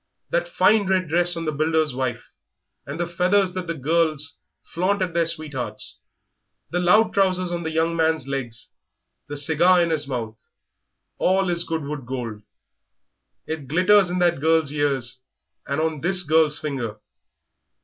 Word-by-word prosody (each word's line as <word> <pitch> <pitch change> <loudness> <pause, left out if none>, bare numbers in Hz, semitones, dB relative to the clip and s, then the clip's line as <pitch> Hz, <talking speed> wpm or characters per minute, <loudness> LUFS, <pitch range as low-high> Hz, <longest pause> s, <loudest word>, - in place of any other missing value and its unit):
That - - 0
fine 220 - +3
red 185 -3 +1
dress 175 +1 +2
on 165 - -4
the 155 - 0
builder's 155 -1 +1
wife, 125 -2 -4 0.6
and 145 +4 -6
the 175 - 0
feathers 180 +2 +1
that 185 -1 -5
the 165 - -3
girls 155 +1 0 0.2
flaunt 190 +4 -1
at 180 -2 -4
their 170 -1 +1
sweethearts, 140 -10 -4 0.7
the 180 - 0
loud 210 +6 +4
trousers 185 -2 +1
on 175 0 -2
the 160 - -3
young 160 +1 0
man's 160 -4 +1
legs, 125 -5 -5 0.6
the 145 - -6
cigar 165 +5 +4
in 170 -1 +1
his 150 -3 -1
mouth 115 -5 -5 0.8
all 190 0 +2
is 170 0 +1
Goodwood 150 -5 -4
gold. 120 -5 -5 1.0
It 155 -4 -5
glitters 185 +5 +4
in 180 - -2
that 175 -5 +2
girl's 160 -2 +2
ears 135 -4 0 0.5
and 140 +2 -1
on 160 -2 -1
this 180 +2 +2
girl's 155 -1 +3
finger. 125 -8 -4
160 Hz, 155 wpm, -23 LUFS, 140-180 Hz, 1.0 s, loud